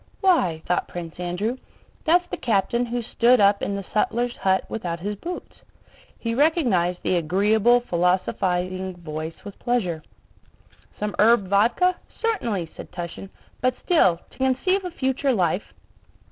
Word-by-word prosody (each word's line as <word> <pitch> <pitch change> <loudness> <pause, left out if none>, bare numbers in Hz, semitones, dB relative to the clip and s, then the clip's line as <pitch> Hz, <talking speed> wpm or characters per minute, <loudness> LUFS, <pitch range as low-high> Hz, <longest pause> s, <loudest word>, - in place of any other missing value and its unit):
"Why," 185 - +2
thought 180 - 0
Prince 170 -1 -8
Andrew, 180 +8 -2 0.5
"that's 350 +2 +4
the - - -2
captain 235 +2 +1
who 240 0 -2
stood 240 +2 +3
up 200 0 +4
in 200 - -2
the 200 -1 -5
sutler's 240 +3 0
hut 190 0 +1
without 175 -6 -4
his 205 +4 -3
boots." 350 - -7 0.6
He 230 -1 -3
recognized 235 - +2
the 180 - +2
agreeable, 210 +8 +3
philosophizing 185 -1 0
voice 160 0 -7
with 205 - -9
pleasure. 185 -10 -1 1.0
"Some 210 0 -2
herb 215 -2 +5
vodka? 235 - +3 0.2
Certainly!" 230 - -1
said - - -10
Túshin. 175 +2 -7 0.3
"But 255 0 +2
still, 185 - +4
to - - -20
conceive 265 +10 +1
a - - -2
future 265 -3 0
life..." 180 -2 0
205 Hz, 140 wpm, -24 LUFS, 180-245 Hz, 1.0 s, herb